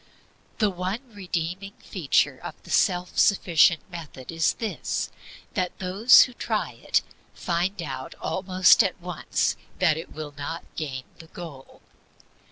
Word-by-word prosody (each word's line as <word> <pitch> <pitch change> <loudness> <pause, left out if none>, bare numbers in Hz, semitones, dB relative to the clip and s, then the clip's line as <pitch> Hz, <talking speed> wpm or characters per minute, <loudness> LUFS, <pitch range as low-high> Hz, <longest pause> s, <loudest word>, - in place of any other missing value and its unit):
The 210 -3 +2
one 195 +7 -4
redeeming 185 0 -4
feature 170 -8 +1
of - - -7
the - - -11
self 180 -1 +2
sufficient 170 -4 +5
method 155 -6 -8
is 165 -1 +2
this 225 -2 -3 0.4
that 180 -2 -2
those 195 +7 +6
who 250 - -5
try - - -2
it - - 0 0.3
find 180 +3 -1
out 130 -3 -6
almost 185 +2 +4
at 190 -2 -2
once 175 -2 -1 0.2
that 160 -4 +3
it 165 - -7
will 150 -1 -7
not 155 +4 -5
gain 135 -5 -4 0.2
the 165 - -12
goal. 160 -6 -11
175 Hz, 135 wpm, -25 LUFS, 160-190 Hz, 0.4 s, those